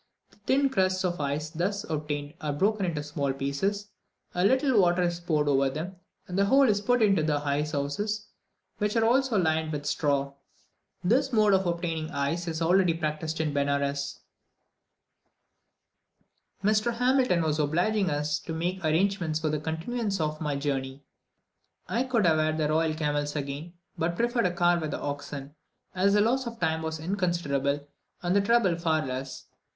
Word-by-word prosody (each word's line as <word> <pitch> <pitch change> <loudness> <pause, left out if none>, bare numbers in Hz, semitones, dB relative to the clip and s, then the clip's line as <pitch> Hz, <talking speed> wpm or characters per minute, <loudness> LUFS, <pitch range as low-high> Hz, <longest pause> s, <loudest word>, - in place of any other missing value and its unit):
The - - -24
thin 275 +1 +3
crusts 185 -4 +1
of 175 -3 -1
ice 145 +2 -2
thus 195 +5 -2
obtained 150 -2 -3
are 150 - -1
broken 195 +6 +1
into 155 -4 -2
small 145 -2 -2
pieces, 190 +10 -2 0.4
a 180 - 0
little 260 0 +4
water 175 0 +3
is 175 -1 -1
poured 155 -4 0
over 135 -1 +3
them, 165 +7 -5 0.3
and 180 - -6
the 200 - +4
whole 270 +5 +5
is 205 -2 +2
put 245 +2 +2
into 195 -5 +4
the 155 -1 +1
ice 145 +1 -1
houses, 205 +10 -2 0.5
which 210 +1 0
are 225 -1 +3
also 255 -1 +3
lined 160 -3 +1
with 145 -1 -4
straw. 140 -2 0 0.7
This 260 +9 +2
mode 215 -3 +4
of 190 -1 +2
obtaining 170 -2 -2
ice 150 +4 -2
is 165 0 -2
already 180 0 +3
practised 160 0 -3
in 155 -2 0
Benares. 140 0 -1 2.4
Mr. 215 +3 +2
Hamilton 250 -7 +2
was 155 -1 0
so 150 - +2
obliging 185 +6 +1
as 150 0 -1
to 165 - -6
make 175 +4 -2
the 160 - 0
arrangements 170 -1 +1
for 155 -1 -1
the 150 0 -1
continuance 195 +7 -2
of 155 0 -2
my 150 -2 -1
journey. 140 -1 -3 0.8
I 245 +3 0
could 235 -6 +1
have 160 -2 +4
had 155 0 +1
the 155 -1 +1
royal 160 0 +1
camels 145 -1 -1
again, 145 +4 -5 0.3
but 170 +1 0
preferred 235 -1 +1
a - - -1
car 175 0 +2
with 155 -3 -3
oxen, 145 0 -5 0.4
as 195 +2 +3
the 205 - +5
loss 250 +4 +1
of 230 -1 -7
time 160 -1 0
was 160 0 -4
inconsiderable, 155 -6 -1 0.4
and 175 +2 +1
the 200 - +5
trouble 205 -4 +3
far 160 -2 0
less. 130 +1 -5
Mr. - - -32
165 Hz, 175 wpm, -27 LUFS, 150-200 Hz, 2.4 s, whole